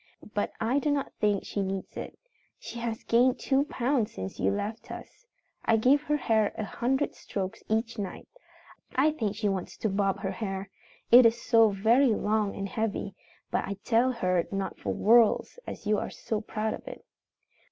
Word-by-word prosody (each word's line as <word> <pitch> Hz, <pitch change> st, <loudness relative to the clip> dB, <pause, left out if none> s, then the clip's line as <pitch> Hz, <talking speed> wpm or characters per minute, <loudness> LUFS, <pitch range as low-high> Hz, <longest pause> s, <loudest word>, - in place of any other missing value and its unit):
But 205 Hz, -, -1 dB
I 240 Hz, +6 st, +1 dB
do 295 Hz, -, -1 dB
not 285 Hz, -1 st, -1 dB
think 205 Hz, -2 st, +1 dB
she 200 Hz, -, -2 dB
needs 190 Hz, 0 st, -4 dB
it. -, -, -7 dB, 0.4 s
She 235 Hz, -, -8 dB
has 230 Hz, -1 st, -3 dB
gained 250 Hz, +3 st, +3 dB
two 275 Hz, +1 st, +1 dB
pounds 255 Hz, -5 st, 0 dB
since 95 Hz, 0 st, -7 dB
you 95 Hz, -, +2 dB
left 205 Hz, -, -4 dB
us. -, -, -10 dB, 0.4 s
I 225 Hz, -, +3 dB
give 260 Hz, +6 st, +4 dB
her 300 Hz, 0 st, 0 dB
hair 220 Hz, -6 st, +2 dB
a -, -, -2 dB
hundred 260 Hz, +7 st, -1 dB
strokes 190 Hz, -2 st, -5 dB
each 225 Hz, +1 st, -1 dB
night. 195 Hz, -3 st, -5 dB, 0.7 s
I 285 Hz, +4 st, +4 dB
think 220 Hz, -9 st, -2 dB
she 210 Hz, 0 st, -1 dB
wants 195 Hz, -2 st, -3 dB
to 220 Hz, -, -1 dB
bob 195 Hz, 0 st, 0 dB
her 190 Hz, -2 st, -2 dB
hair, 195 Hz, -1 st, -4 dB, 0.4 s
it 240 Hz, 0 st, +10 dB
is 230 Hz, +1 st, 0 dB
so 225 Hz, -2 st, +5 dB
very 225 Hz, +5 st, +3 dB
long 210 Hz, -1 st, 0 dB
and 195 Hz, 0 st, -3 dB
heavy, 205 Hz, -1 st, -2 dB, 0.4 s
but -, -, 0 dB
I 200 Hz, -, -4 dB
tell 245 Hz, +2 st, +3 dB
her 185 Hz, -7 st, 0 dB
not 195 Hz, -1 st, -3 dB
for 100 Hz, -, -2 dB
worlds, 225 Hz, -, +4 dB
as -, -, -7 dB
you 210 Hz, 0 st, +2 dB
are -, -, -4 dB
so 215 Hz, -2 st, -3 dB
proud 215 Hz, 0 st, -2 dB
of -, -, -9 dB
it. -, -, -9 dB
220 Hz, 185 wpm, -28 LUFS, 200-240 Hz, 0.7 s, it